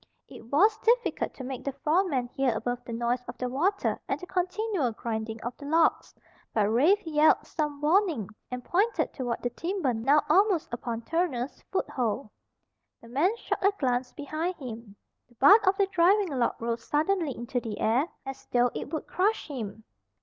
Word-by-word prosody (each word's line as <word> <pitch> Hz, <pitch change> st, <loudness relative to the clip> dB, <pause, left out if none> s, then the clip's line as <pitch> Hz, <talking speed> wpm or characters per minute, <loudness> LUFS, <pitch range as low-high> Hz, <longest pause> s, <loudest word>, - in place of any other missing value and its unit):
It 225 Hz, -, -12 dB
was 415 Hz, +9 st, +4 dB
difficult 475 Hz, +1 st, +1 dB
to 265 Hz, -, -8 dB
make 260 Hz, 0 st, -5 dB
the 275 Hz, -, -3 dB
foreman 300 Hz, -2 st, +1 dB
hear 260 Hz, -2 st, 0 dB
above 245 Hz, +2 st, -3 dB
the 235 Hz, -, -8 dB
noise 240 Hz, +2 st, -1 dB
of 240 Hz, -, -7 dB
the 250 Hz, -, -2 dB
water 345 Hz, +11 st, 0 dB
and -, -, -1 dB
the 360 Hz, -, -8 dB
continual 365 Hz, -, -1 dB
grinding 220 Hz, 0 st, -4 dB
of 240 Hz, -, -4 dB
the 285 Hz, -, -9 dB
logs, 320 Hz, +2 st, +2 dB, 0.4 s
but 215 Hz, -2 st, +3 dB
Rafe 340 Hz, -, +3 dB
yelled 310 Hz, -1 st, +4 dB
some 295 Hz, -3 st, -3 dB
warning 320 Hz, -, +2 dB, 0.2 s
and 250 Hz, -1 st, -5 dB
pointed 410 Hz, +6 st, +1 dB
toward 245 Hz, -3 st, -3 dB
the 245 Hz, -, -1 dB
timber 335 Hz, -2 st, -1 dB
now 270 Hz, +7 st, +3 dB
almost 385 Hz, -, +3 dB
upon 235 Hz, -1 st, -4 dB
Turner's 290 Hz, -6 st, -2 dB
foothold. 245 Hz, -, -2 dB, 0.7 s
The 230 Hz, -, -15 dB
man 340 Hz, -, +1 dB
shot -, -, -3 dB
a 395 Hz, -, +5 dB
glance 250 Hz, -3 st, 0 dB
behind 310 Hz, +5 st, -3 dB
him. 230 Hz, -7 st, -9 dB, 0.3 s
The 240 Hz, -, -24 dB
butt 395 Hz, -, +6 dB
of 380 Hz, +1 st, +4 dB
the 400 Hz, -, +4 dB
driving 385 Hz, +1 st, +3 dB
log 255 Hz, -5 st, 0 dB
rose 230 Hz, 0 st, -3 dB
suddenly 310 Hz, -2 st, 0 dB
into 245 Hz, +2 st, -2 dB
the 225 Hz, -3 st, -6 dB
air 245 Hz, +8 st, +2 dB, 0.2 s
as 270 Hz, 0 st, -8 dB
though 245 Hz, 0 st, +3 dB
it -, -, -6 dB
would 315 Hz, -, -3 dB
crush 405 Hz, 0 st, 0 dB
him. 220 Hz, -6 st, -6 dB
275 Hz, 180 wpm, -28 LUFS, 240-360 Hz, 0.7 s, butt